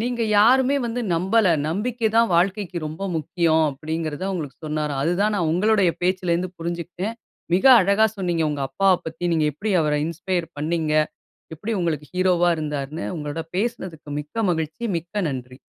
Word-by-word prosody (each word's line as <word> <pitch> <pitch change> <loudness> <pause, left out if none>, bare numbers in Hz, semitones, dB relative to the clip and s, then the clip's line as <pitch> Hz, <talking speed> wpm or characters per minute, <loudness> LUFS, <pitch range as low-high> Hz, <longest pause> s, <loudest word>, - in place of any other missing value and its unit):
நீங்க 240 0 -1 0.2
யாருமே 260 +5 +5
வந்து 235 +2 -3
நம்பல. 190 +5 +2 0.2
நம்பிக்கை 225 +6 -1
தான் 230 0 +5
வாழ்க்கைக்கு 190 +1 +1
ரொம்ப 155 +5 -7
முக்கியம்." 160 0 +1
அப்படிங்கிறத 155 +3 -4
அவுங்களுக்கு 155 -8 -4
சொன்னாராம். 150 -2 -2
அதுதான் 200 +6 +1
நான் 170 -4 +1
உங்களுடைய 200 0 +3
பேச்சில 185 -1 +1
இருந்து 180 +1 -2
புரிஞ்சுக்கிட்டேன் 175 +6 -4 0.4
மிக 185 - +1 0.2
அழகா 200 +4 +4
சொன்னீங்க 175 -4 0
உங்க 145 -2 -3
அப்பாவ 195 -1 +3
பத்தி. 175 - -6
நீங்க 160 -2 +2
எப்படி 205 +9 -4
அவரை 150 -1 +1
இன்ஸ்பயர் 175 +1 -2
பண்ணீங்க, 155 0 -1 0.6
எப்படி 210 +9 -4
உங்களுக்கு 150 -4 -2
ஹீரோவா 180 -1 +3
இருந்தார்ன்னு. 150 +1 -4
உங்களோட 150 +1 -4
பேசினதுக்கு 185 -9 -3
மிக்க 210 +10 -3
மகிழ்ச்சி 160 +7 -3
மிக்க 175 +5 -15 0.2
நன்றி. 125 0 -7
175 Hz, 150 wpm, -23 LUFS, 155-200 Hz, 0.6 s, யாருமே